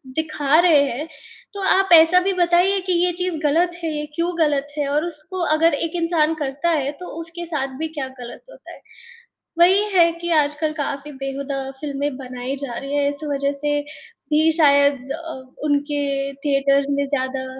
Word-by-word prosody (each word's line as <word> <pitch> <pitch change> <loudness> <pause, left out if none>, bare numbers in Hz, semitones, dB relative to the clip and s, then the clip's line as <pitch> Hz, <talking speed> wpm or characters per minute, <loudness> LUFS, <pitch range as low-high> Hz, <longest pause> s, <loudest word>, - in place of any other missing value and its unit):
दिखा 310 -1 +1
रहे 330 -5 +5
हैं, 295 +7 -5 0.5
तो 400 - -5
आप 385 0 +2
ऐसा 330 +2 +7
भी 390 - +2
बताइए 355 +3 +3
कि 365 - +2
ये 360 - +2
चीज़ 360 -3 -1
गलत 335 +4 +2
है, 305 -2 -2
क्यों 340 +1 0
गलत 290 -2 +1
है 290 -1 0
और 300 +3 0
उसको 345 +3 -8 0.2
अगर 325 0 +3
एक 330 +3 -2
इंसान 325 -2 +2
करता 280 +5 -2
है 285 -4 0
तो 360 - -8
उसके 340 +1 -7
साथ 270 -5 -4
भी 320 - -1
क्या 265 - -3
गलत 240 -1 -9
होता - - -14
है। - - -13 0.8
वही 375 +4 +6
है 335 -2 +5
कि 345 0 -2
आजकल 300 +2 -3
काफ़ी 280 +1 -4
बेहूदा 275 0 -4 0.2
फ़िल्में 285 -1 -3
बनाई 255 0 -5
जा 240 - -7
रही 275 +1 -4
हैं 285 0 +2
इस 285 +2 -7
वज़ह 280 0 0
से 290 0 0 0.5
भी 315 +2 +4
शायद 280 -3 +3
अ, 330 +1 -5 0.3
उनके 285 -1 -1
थिएटर्स 275 0 +2
में 280 - 0
ज़्यादा 260 -1 -2
295 Hz, 175 wpm, -21 LUFS, 275-330 Hz, 0.8 s, ऐसा